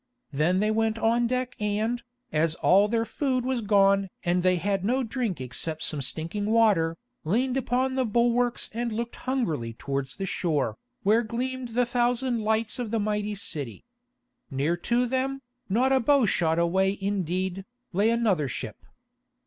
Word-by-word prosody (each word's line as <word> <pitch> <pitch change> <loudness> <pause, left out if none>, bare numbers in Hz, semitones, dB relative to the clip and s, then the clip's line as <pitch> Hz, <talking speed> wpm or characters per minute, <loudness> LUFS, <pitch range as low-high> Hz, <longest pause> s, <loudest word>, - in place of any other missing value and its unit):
Then 165 +7 +2
they 215 +1 +2
went 220 0 +1
on 235 +2 +2
deck 255 +1 -2
and, 215 +3 -1 0.3
as 155 +1 +1
all 200 +4 +4
their 225 +1 0
food 255 +2 -1
was 260 -2 0
gone 200 -2 +3
and 175 +1 +1
they 185 0 +3
had 195 +2 -1
no 255 +6 +1
drink 230 - -2
except 155 +5 -4
some 150 -3 -1
stinking 165 +9 -3
water, 205 -8 +3 0.3
leaned 245 +10 +1
upon 260 0 0
the 260 0 +1
bulwarks 240 +1 +1
and 235 +1 -2
looked 235 +2 -3
hungrily 165 - -2
towards 135 +2 -4
the 195 - -3
shore, 150 - -1 0.3
where 215 +3 +4
gleamed 245 +1 -4
the 245 0 +3
thousand 245 0 0
lights 220 +2 0
of 240 -3 -3
the 225 +1 0
mighty 210 0 -1
city. 145 - -4 0.6
Near 145 +5 0
to 240 +8 +1
them, 265 +2 -2 0.3
not 250 +7 +2
a 265 - +4
bowshot 225 - +3
away 190 +3 +2
indeed, 190 -1 -2 0.3
lay 205 +5 +3
another 215 -11 +2
ship. 125 - -5
215 Hz, 155 wpm, -26 LUFS, 180-240 Hz, 0.6 s, all